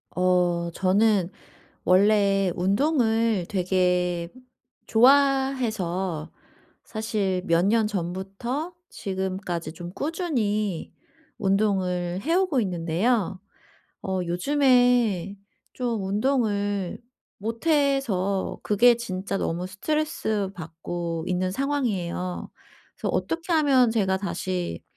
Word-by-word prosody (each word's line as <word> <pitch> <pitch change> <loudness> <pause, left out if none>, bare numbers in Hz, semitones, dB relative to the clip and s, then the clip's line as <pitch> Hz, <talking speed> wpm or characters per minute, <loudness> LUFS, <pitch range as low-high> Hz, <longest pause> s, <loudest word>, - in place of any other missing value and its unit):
어 180 -1 +2
저는 195 0 +2 0.6
원래 195 0 +4
운동을 225 - +2
되게 180 -2 +1 0.6
좋아해서 230 - +2 0.5
사실 210 -5 -2
몇 170 +2 +3
년 220 +1 +3
전부터 195 - -4 0.2
지금까지 185 -4 -4
좀 175 +1 -8
꾸준히 215 - -2 0.4
운동을 190 -3 0
해 320 +8 0
오고 365 -9 +2
있는데요. 185 +3 0 0.6
어 190 -1 -1
요즘에 245 - +2 0.4
좀 235 -6 -2
운동을 205 -3 0 0.4
못해서 230 - 0
그게 235 +3 +5
진짜 195 -4 -4
너무 175 +2 -2
스트레스 215 -2 -1
받고 165 0 -5
있는 185 0 0
상황이에요. 195 -9 -2 0.5
그래서 - - -3
'어떻게 335 +1 -2
하면 270 -6 +4
제가 195 -4 +1
다시 185 - -3
200 Hz, 195 characters per minute, -25 LUFS, 180-240 Hz, 0.6 s, 그게